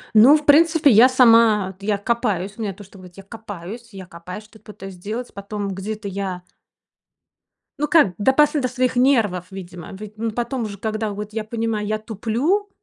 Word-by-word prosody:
Ну, 255 Hz, +8 st, +8 dB
в 300 Hz, -, -9 dB
принципе, 315 Hz, 0 st, +5 dB
я 235 Hz, +4 st, +7 dB
сама 230 Hz, -6 st, +4 dB
я 205 Hz, +1 st, -1 dB
копаюсь, 205 Hz, -3 st, -2 dB
у 230 Hz, -, -7 dB
меня 200 Hz, -3 st, -3 dB
то, 205 Hz, -, -13 dB
что 195 Hz, 0 st, -16 dB
говорить 180 Hz, 0 st, -15 dB
я 195 Hz, -, -10 dB
копаюсь 220 Hz, +1 st, -9 dB
я 190 Hz, -1 st, -9 dB
копаюсь, 180 Hz, +4 st, -10 dB
что-то 220 Hz, +1 st, -19 dB
пытаюсь 195 Hz, -2 st, -10 dB
сделать. 215 Hz, +7 st, -6 dB
Потом 200 Hz, 0 st, -5 dB
где-то 205 Hz, +2 st, -6 dB
я 190 Hz, -2 st, -5 dB, 1.4 s
Ну 295 Hz, -, 0 dB
как, 300 Hz, -, +4 dB
допас 265 Hz, +7 st, +3 dB
до 275 Hz, -4 st, 0 dB
своих 255 Hz, 0 st, -1 dB
нервов, 230 Hz, -9 st, +2 dB
видимо. 180 Hz, -3 st, -9 dB
Ведь, 210 Hz, +2 st, -10 dB
ну, 225 Hz, 0 st, -2 dB
потом 240 Hz, +2 st, -3 dB
уже, 205 Hz, -2 st, -6 dB
когда 215 Hz, +1 st, -3 dB
вот 210 Hz, +1 st, -7 dB
я 220 Hz, -1 st, -3 dB
понимаю, 220 Hz, -2 st, -3 dB
я 215 Hz, -, -1 dB
туплю 235 Hz, -, -1 dB
215 Hz, 180 wpm, -21 LUFS, 195-240 Hz, 1.4 s, Ну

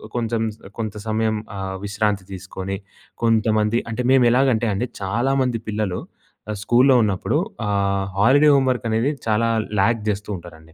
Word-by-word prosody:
కొంచెం 115 Hz, -1 st, -1 dB
స -, -, -27 dB, 0.2 s
కొంత 110 Hz, -3 st, -3 dB
సమయం 110 Hz, 0 st, +1 dB, 0.2 s
ఆహ్, 95 Hz, -1 st, -4 dB
విశ్రాంతి 100 Hz, -1 st, -1 dB
తీసుకొని, 95 Hz, +1 st, -5 dB, 0.5 s
కొంతమంది 110 Hz, -1 st, +2 dB
అంటే, 110 Hz, -, -2 dB
మేము 130 Hz, -2 st, +5 dB
ఎలాగంటే, 125 Hz, -3 st, +3 dB
అండి 110 Hz, +6 st, -1 dB
చాలామంది 120 Hz, +4 st, 0 dB
పిల్లలు 105 Hz, -4 st, -2 dB, 0.5 s
ఆహ్, 105 Hz, -, -4 dB
స్కూల్లో 125 Hz, +3 st, +5 dB
ఉన్నప్పుడు 105 Hz, +8 st, 0 dB, 0.3 s
ఆహ్, 100 Hz, -1 st, 0 dB
హాలిడే 145 Hz, +7 st, +6 dB
హోమ్ 135 Hz, -1 st, +3 dB
వర్క్ 120 Hz, -1 st, -5 dB
అనేది 115 Hz, +6 st, +1 dB, 0.2 s
చాలా 115 Hz, +1 st, +2 dB, 0.3 s
లాగ్ 115 Hz, +2 st, +2 dB
చేస్తూ 105 Hz, 0 st, -3 dB
ఉంటారండి. 80 Hz, -2 st, -14 dB
110 Hz, 145 wpm, -22 LUFS, 100-120 Hz, 0.5 s, హాలిడే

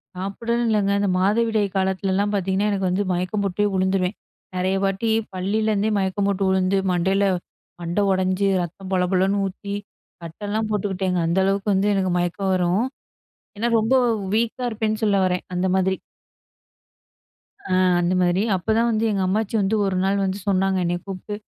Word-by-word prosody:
சாப்பிடணும்ன்னு 230 Hz, +6 st, -2 dB
இல்லைங்க. 200 Hz, -2 st, +2 dB
இந்த 200 Hz, -1 st, +1 dB
மாதவிடாய் 215 Hz, +2 st, +2 dB
காலத்துலலாம் 190 Hz, +1 st, 0 dB
பார்த்தீங்கன்னா, 195 Hz, +1 st, 0 dB
எனக்கு 195 Hz, -2 st, 0 dB
வந்து 185 Hz, +3 st, 0 dB
மயக்கம் 185 Hz, +4 st, -1 dB
போட்டே 200 Hz, +2 st, 0 dB
வுழுந்துருவேன். 190 Hz, +1 st, 0 dB, 0.4 s
நெறைய 185 Hz, +1 st, 0 dB
வாட்டி 195 Hz, +3 st, 0 dB, 0.2 s
பள்ளியிலேருந்தே 210 Hz, +3 st, 0 dB
மயக்கம் 195 Hz, +1 st, 0 dB
போட்டு 200 Hz, 0 st, 0 dB
உழுந்து, 190 Hz, +1 st, +2 dB
மண்டையில 190 Hz, +3 st, +2 dB, 0.6 s
மண்ட 170 Hz, +3 st, -2 dB
ஒடைஞ்சு, 185 Hz, +1 st, +1 dB
ரத்தம் 185 Hz, +3 st, -7 dB
பொலபொலன்னு 190 Hz, +2 st, +2 dB
ஊத்தி, 200 Hz, +1 st, -6 dB, 0.5 s
கட்டல்லாம் 205 Hz, +6 st, -3 dB
போட்டுக்கிட்டேங்க. 190 Hz, -3 st, -1 dB
அந்த 170 Hz, +3 st, +1 dB
அளவுக்கு 200 Hz, +1 st, +1 dB
வந்து 195 Hz, +2 st, +2 dB
எனக்கு 190 Hz, -2 st, 0 dB
மயக்கம் 180 Hz, +2 st, -1 dB
வரும். 185 Hz, +5 st, +1 dB, 0.7 s
ஏன்னா 230 Hz, +3 st, 0 dB
ரொம்ப 225 Hz, +4 st, +2 dB, 0.4 s
வீக்கா 235 Hz, +3 st, 0 dB
இருப்பேன்னு 220 Hz, -1 st, -2 dB
சொல்ல 205 Hz, -2 st, +3 dB
வரேன். 180 Hz, -1 st, -1 dB
அந்த 180 Hz, +1 st, 0 dB
மாதிரி. 190 Hz, 0 st, +2 dB, 1.7 s
அ -, -, -5 dB, 0.3 s
அந்த 175 Hz, +1 st, +1 dB
மாதிரி. 175 Hz, +2 st, +2 dB
அப்பதான் 220 Hz, +6 st, +1 dB
வந்து 220 Hz, 0 st, +1 dB
எங்க 200 Hz, -2 st, 0 dB
அம்மாச்சி 215 Hz, +3 st, -1 dB
வந்து 200 Hz, +3 st, +1 dB
1 195 Hz, -1 st, -1 dB
நாள் 195 Hz, +1 st, +1 dB
வந்து 190 Hz, +1 st, -2 dB
சொன்னாங்க, 190 Hz, -1 st, +2 dB
என்னைய 175 Hz, +1 st, -1 dB
கூப்ட்டு. 195 Hz, +2 st, -6 dB
195 Hz, 150 wpm, -22 LUFS, 185-205 Hz, 1.7 s, சொல்ல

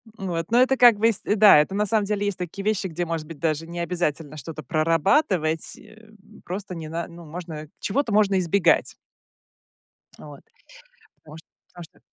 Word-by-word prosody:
Вот, 175 Hz, -4 st, -4 dB
но 240 Hz, +2 st, +5 dB
это 265 Hz, +1 st, +3 dB
как 240 Hz, -4 st, +7 dB
бы, 225 Hz, +2 st, +4 dB
с 210 Hz, -, -2 dB
да, 210 Hz, -6 st, +6 dB
это, 150 Hz, +6 st, 0 dB
на 210 Hz, +1 st, +1 dB
самом 215 Hz, 0 st, +1 dB
деле, 205 Hz, 0 st, -2 dB
есть 205 Hz, -2 st, -2 dB
такие 180 Hz, +2 st, -6 dB
вещи, 210 Hz, -2 st, 0 dB
где, 175 Hz, 0 st, -4 dB
может 165 Hz, -2 st, -4 dB
быть, 165 Hz, -3 st, -10 dB
даже 160 Hz, 0 st, -1 dB
не 170 Hz, +1 st, -7 dB
обязательно 165 Hz, -3 st, -3 dB
что-то 155 Hz, 0 st, -8 dB
прорабатывать, 165 Hz, -, +1 dB
э, 220 Hz, 0 st, -18 dB, 0.3 s
просто 185 Hz, 0 st, -6 dB
не 160 Hz, -2 st, -7 dB
на 165 Hz, +2 st, -4 dB
ну, 170 Hz, 0 st, -13 dB
можно, 160 Hz, -1 st, -8 dB
чего-то 245 Hz, +3 st, -1 dB
можно 200 Hz, -2 st, +3 dB
избегать. 180 Hz, +2 st, +2 dB, 1.2 s
Вот. -, -, -12 dB, 0.8 s
Потому 155 Hz, 0 st, -14 dB
что 160 Hz, -, -15 dB, 0.2 s
потому 175 Hz, -1 st, -11 dB
что 155 Hz, -, -18 dB
175 Hz, 180 wpm, -23 LUFS, 160-205 Hz, 1.2 s, как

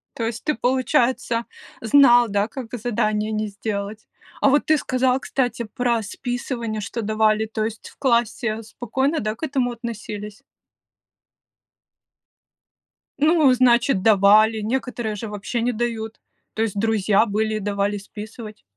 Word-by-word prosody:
То 230 Hz, -, -2 dB
есть 230 Hz, 0 st, -4 dB
ты, 300 Hz, -, +1 dB
получается, 245 Hz, -1 st, +1 dB, 0.4 s
знал, 240 Hz, 0 st, +6 dB
да, 200 Hz, +1 st, +1 dB
как 240 Hz, 0 st, -8 dB
задание 215 Hz, -2 st, -1 dB
не 215 Hz, 0 st, -1 dB
сделать. 205 Hz, +1 st, -5 dB, 0.3 s
А 275 Hz, -, +5 dB
вот 290 Hz, +2 st, +3 dB
ты 310 Hz, 0 st, +4 dB
сказал, 255 Hz, -1 st, +1 dB
кстати, 245 Hz, -3 st, -2 dB
про 235 Hz, +1 st, -1 dB
списывание, 235 Hz, -1 st, -4 dB
что 230 Hz, +3 st, -4 dB
давали, 215 Hz, 0 st, +2 dB
то 215 Hz, 0 st, -2 dB
есть 220 Hz, -1 st, -6 dB
в -, -, -21 dB
классе 235 Hz, -3 st, 0 dB
спокойно, 265 Hz, +7 st, -2 dB
да, 215 Hz, +1 st, -2 dB
к 315 Hz, -, -13 dB
этому 265 Hz, -5 st, 0 dB
относились? 215 Hz, -3 st, -7 dB, 2.8 s
Ну, 305 Hz, -2 st, +4 dB
значит, 245 Hz, -4 st, +3 dB
давали, 215 Hz, +1 st, +5 dB
некоторые 235 Hz, -1 st, -2 dB
же 220 Hz, +2 st, -6 dB
вообще 210 Hz, +3 st, -4 dB
не 245 Hz, +2 st, +1 dB
дают, 225 Hz, -1 st, -4 dB, 0.4 s
то 220 Hz, -, -1 dB
есть 215 Hz, -3 st, -2 dB
друзья 215 Hz, -1 st, +2 dB
были 215 Hz, 0 st, -1 dB
и -, -, -2 dB
давали 205 Hz, 0 st, -1 dB
списывать. 215 Hz, +2 st, -10 dB
225 Hz, 135 wpm, -22 LUFS, 215-245 Hz, 2.8 s, знал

